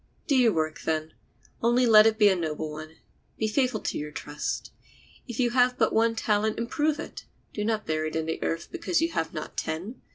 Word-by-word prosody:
Do 280 - +2
your 245 -3 +5
work, 155 -3 -2
then; 155 0 -2 0.5
only 240 +2 +3
let 215 -2 +8
it 220 -1 +1
be 210 -2 +6
a 195 - +4
noble 155 -2 -3
one. 155 +1 -9 0.4
Be 220 - 0
faithful 255 +4 +1
to - - -2
your 150 0 -5
trust. 145 0 -4 0.6
If 240 -1 -6
you 245 -2 +2
have 250 0 +3
but 220 - +2
one 225 +1 +3
talent 215 -1 +1
improve 295 +6 0
it; - - -8 0.3
do 210 - -3
not 215 0 -1
bury 155 0 -1
it 155 - -6
in 160 -1 -1
the 160 - -3
earth 165 +1 -2
because 345 0 0
you 330 +1 +1
have 160 - -2
not 155 -2 -6
ten. 185 +10 -4
215 Hz, 215 wpm, -27 LUFS, 160-240 Hz, 0.6 s, let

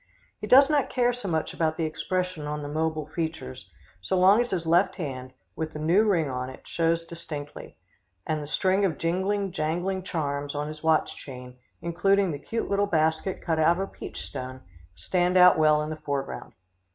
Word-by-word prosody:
He - - -5
does 270 +2 +8
not 295 -3 +1
care 245 -1 +2
so 245 -4 -6
much 160 -3 -1
about 160 -1 0
the 165 - 0
expression 180 0 -2
on 150 0 -4
the - - -4
mobile 155 0 -1
features, 160 - -5 0.3
so 140 - -1
long 195 +5 +6
as 240 - -2
his 175 -3 -2
left 170 +4 +3
hand, 130 -6 -5 0.2
with 160 0 -4
the 150 - -6
new 175 +8 +3
ring 175 -7 +2
on 130 -1 -3
it, 130 - -12
shows 165 0 0
distinctly, 150 -3 -8 0.5
and 155 -1 -1
the 145 - -7
string 190 +5 +1
of 170 -7 +1
jingling, 190 +4 0
jangling 175 +3 -1
charms 145 -5 -3
on 145 +1 -2
his 155 0 -8
watch 160 -1 +2
chain, 125 -2 -10 0.3
including 190 +3 +2
the 145 - -5
cute 225 +10 -3
little 200 0 +1
basket 160 +1 0
cut 160 -2 0
out 170 +2 +4
of - - -5
a 195 - 0
peach - - -8
stone, 130 -1 -7 0.3
stand 180 - +1
out 180 0 +8
well 150 -1 +4
in 155 - -4
the - - -3
foreground. 140 -2 -4
165 Hz, 195 wpm, -26 LUFS, 150-185 Hz, 0.5 s, does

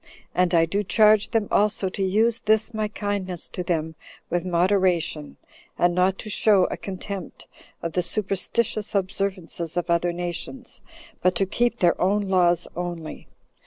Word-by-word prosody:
And 180 -1 +2
I 165 0 +5
do 195 +5 -1
charge 215 +2 +4
them 220 -3 0
also 210 -1 +2
to 195 - -6
use 220 +5 +2
this 220 +2 +1
my 215 -1 -1
kindness 205 -4 -3
to - - -5
them 160 -2 -1 0.4
with 175 0 0
moderation, 180 -4 +1 0.4
and 175 0 +3
not 185 +2 +2
to - - -7
show 205 -3 +4
a - - -1
contempt 195 -1 -7 0.4
of 165 -1 -3
the 180 - +1
superstitious 210 +3 -1
observances 185 -3 -2
of 175 0 -1
other 170 +1 +2
nations, 175 +8 -5 0.4
but 185 0 +2
to 195 - +1
keep 240 +4 0
their 175 -5 +2
own 200 +2 +1
laws 175 -2 +3
only. 175 -3 -6
185 Hz, 155 wpm, -24 LUFS, 175-205 Hz, 0.4 s, I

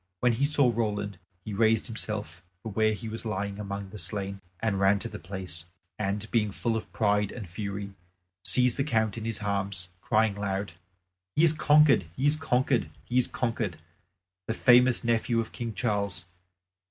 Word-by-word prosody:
When 125 - +3
he 130 +5 +1
saw 140 -4 +4
Roland, 105 -4 -2 0.3
he 105 - -5
raised 110 +1 +3
himself 105 -7 -5 0.2
from 110 - -5
where 110 +1 +3
he 110 +2 -6
was 110 +1 -5
lying 100 -2 -3
among 100 -1 -5
the 105 - -7
slain 100 -1 0 0.2
and 110 -4 0
ran 100 +1 +4
to 100 - -3
the - - -8
place, 90 -2 -3 0.3
and, 100 0 -1
being 110 -3 +2
full 115 +3 -1
of 110 - -5
pride 105 -3 +1
and 110 -6 -7
fury, 100 +2 -5 0.5
seized 125 -1 +4
the 135 - +2
Count 110 -7 +1
in 115 -1 -5
his 115 -2 -2
arms, 100 -3 -2
crying 110 -2 +2
aloud, 100 -3 -2 0.6
"He 155 - +4
is 165 -2 +6
conquered, 150 - +5
he 135 - -1
is 145 +1 +4
conquered, 130 -3 +1 0.2
he 125 +1 +2
is 125 - +2
conquered, 115 -7 -2 0.7
the 110 - -1
famous 125 0 +5
nephew 115 0 +1
of 115 - -3
King 120 -1 -4
Charles! 100 -6 -1
110 Hz, 175 wpm, -28 LUFS, 100-120 Hz, 0.7 s, is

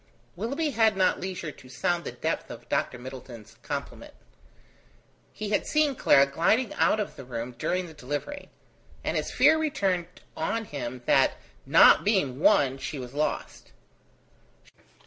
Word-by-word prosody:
Willoughby 275 - -2
had 220 -4 +3
not 185 - +2
leisure 180 -4 -5
to 130 - -16
sound 170 +8 -1
the - - -4
depth - - -3
of - - -10
Dr. 125 - -1
Middleton's 125 -3 -10
compliment. - - -6 1.2
He 215 -1 -5
had 205 - 0
seen 300 -3 +2
Clara 140 - +5
gliding 185 - +1
out 220 - +2
of 210 - -3
the - - -9
room 120 -1 -5
during 180 +7 -1
the 165 - -11
delivery; 145 - -5 0.5
and - - -2
his - - -1
fear 315 - +4
returned 195 - 0 0.3
on 225 +8 -2
him 125 -6 -6
that, - - +4 0.3
not - - +7
being 185 - +1
won, 145 -8 +3
she 135 +2 -5
was 125 -1 -8
lost. 150 +2 -3
170 Hz, 145 wpm, -27 LUFS, 130-215 Hz, 1.2 s, not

